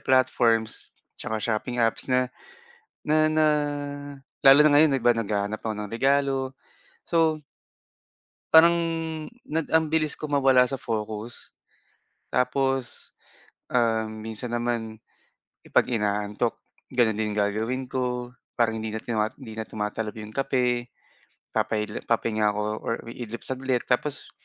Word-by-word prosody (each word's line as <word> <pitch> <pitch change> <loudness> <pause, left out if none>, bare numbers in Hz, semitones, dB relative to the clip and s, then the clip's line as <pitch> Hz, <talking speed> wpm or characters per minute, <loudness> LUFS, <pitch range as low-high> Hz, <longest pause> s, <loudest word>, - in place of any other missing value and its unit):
platforms 120 -4 +2 0.2
tsaka 110 0 -3
shopping 120 +3 -2
apps 115 +2 +1
na 125 0 +3 0.8
na 155 0 +3
na 155 0 +3 1.0
lalo 135 +1 +9
na 155 - +6
ngayon 150 -2 +5
iba 120 -1 +4
naghahanap 105 -2 -2
ako 110 - -2
ng 105 -1 -5
regalo, 135 +1 +1 0.5
so 160 -2 +1 1.1
Parang 170 +1 +8 0.7
nad 160 +2 0
ang 160 0 +4
bilis 155 -1 +1
ko 155 - -4
mawala 135 -3 +4
sa 135 - -2
focus. 110 -2 -5 0.8
Tapos, 135 0 0 0.6
um, 115 -2 +1 0.2
minsan 110 +2 -5
naman, 115 -2 -2 0.7
'pag - - +4
inaantok, 105 0 -1 0.3
gano'n 120 -3 +2
din 105 -1 -1
gagawin 110 +5 0
ko, 125 -1 -2 0.2
parang 115 -2 +1
hindi 110 - -3
na 110 0 -5
tumat 110 -2 -1
hindi 125 -5 -10
na 110 0 -6
tumatalab 105 0 -4
'yong 110 -1 -8
kape. 125 -1 0 0.6
Papa-idlip 105 0 -2
papahinga 110 -2 +1
ako 105 0 0 0.2
or - - -2 0.2
iidlip 115 -1 -7
saglit, 130 -1 -1
tapos 130 +2 -1
120 Hz, 125 wpm, -26 LUFS, 110-135 Hz, 1.1 s, lalo